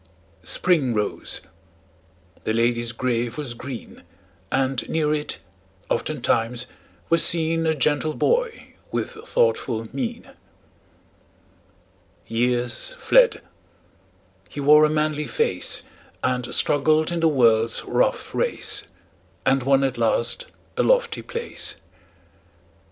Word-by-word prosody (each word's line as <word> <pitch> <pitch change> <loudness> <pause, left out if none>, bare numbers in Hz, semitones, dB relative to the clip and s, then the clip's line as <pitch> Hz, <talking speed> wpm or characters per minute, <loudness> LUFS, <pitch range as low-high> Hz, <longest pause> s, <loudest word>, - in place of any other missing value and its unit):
Spring 145 -10 +2
rose; 105 -1 -2 1.0
the 110 - -1
lady's 120 0 +1
grave 120 0 -2
was 145 -5 -4
green; 120 0 -8 0.5
And 130 -1 0
near 155 -2 +1
it, 150 -1 -3 0.5
oftentimes, 120 +2 0 0.4
was 165 0 +4
seen 165 0 +1
A 160 - +2
gentle 150 +2 +1
boy 480 -1 0 0.2
with - - -2
thoughtful 440 - 0
mien. 130 -4 -4 1.9
Years 120 - 0
fled; - - +4 1.1
he - - -8
wore 150 +2 +7
a - - +2
manly 150 0 0
face, 460 +1 0 0.4
And 125 -1 -1
struggled 155 +3 +2
in 170 - -1
the 165 - +4
world's 115 -6 +3
rough - - 0
race, - - 0 0.6
And 135 0 +3
won 135 +1 +3
at 130 -3 -1
last 115 - 0 0.3
a - - +3
lofty - - +2
place. 470 0 -4
140 Hz, 105 wpm, -23 LUFS, 120-165 Hz, 1.9 s, wore